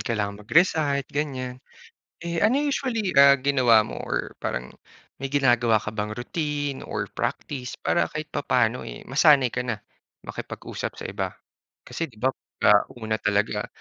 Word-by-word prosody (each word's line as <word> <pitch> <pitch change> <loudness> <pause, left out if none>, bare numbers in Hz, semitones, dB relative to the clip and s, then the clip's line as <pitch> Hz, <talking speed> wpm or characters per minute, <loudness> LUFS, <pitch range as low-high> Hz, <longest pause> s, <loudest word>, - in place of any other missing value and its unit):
kailangan 105 -2 -2
mag-recite, 145 - +2
ganyan, 130 -4 -3 0.6
eh, 170 0 -3
ano 225 +6 +4
usually, 245 -8 -1
ah, 140 0 +8
ginawa 130 -5 +4
mo - - -6
or - - -3
parang 60 +1 -3 0.5
may 135 - -3
ginagawa 120 -5 +3
ka 105 +1 -5
bang 105 -1 -2
routine 145 +1 -3
or - - -3
practice 130 -4 -4
para 170 - +1
kahit 155 0 -4
papaano, 125 -3 +1
eh, - - -9
masanay 135 -3 +4
ka 125 - 0
na 120 -3 -3 0.5
makipag-usap - - -6
sa - - -7
iba? - - -2 0.6
Kasi 165 - -4
di 115 - -21
ba 130 +4 +1 0.3
ah, 105 0 +7
una 110 -1 -2
talaga 105 -1 0
130 Hz, 150 wpm, -25 LUFS, 110-150 Hz, 0.6 s, ah